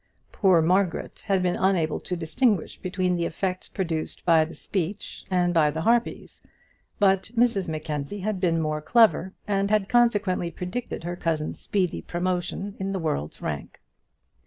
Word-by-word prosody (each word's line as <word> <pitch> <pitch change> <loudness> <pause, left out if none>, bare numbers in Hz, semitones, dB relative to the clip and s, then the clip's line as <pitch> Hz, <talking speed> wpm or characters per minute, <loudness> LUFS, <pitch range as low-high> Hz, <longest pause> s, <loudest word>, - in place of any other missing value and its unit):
Poor 185 -5 +4
Margaret 180 +1 0
had 195 -2 +2
been 180 -1 +1
unable 180 -5 +1
to 180 - -4
distinguish 175 +4 0
between 185 -1 -1
the 170 - 0
effects 185 +2 -3
produced 165 -5 -3
by 165 -2 +5
the 160 +1 -7
speech 190 +4 -4
and 180 -1 +2
by 155 -3 +4
the 160 +2 -3
harpies; 235 +5 0 0.6
but 195 -1 +3
Mrs 230 -6 +3
Mackenzie 155 +3 -4
had 210 -1 -2
been 170 -3 +2
more 155 -1 -1
clever, 210 -1 +3
and 200 -1 +1
had 210 -2 +2
consequently 205 -7 +2
predicted 180 +4 -5
her 175 +1 -3
cousin's 160 -3 -2
speedy 185 -4 -1
promotion 185 +3 -2
in 195 +1 -2
the 190 - -1
world's 75 - -3
rank. - - -5
180 Hz, 155 wpm, -25 LUFS, 165-195 Hz, 0.6 s, by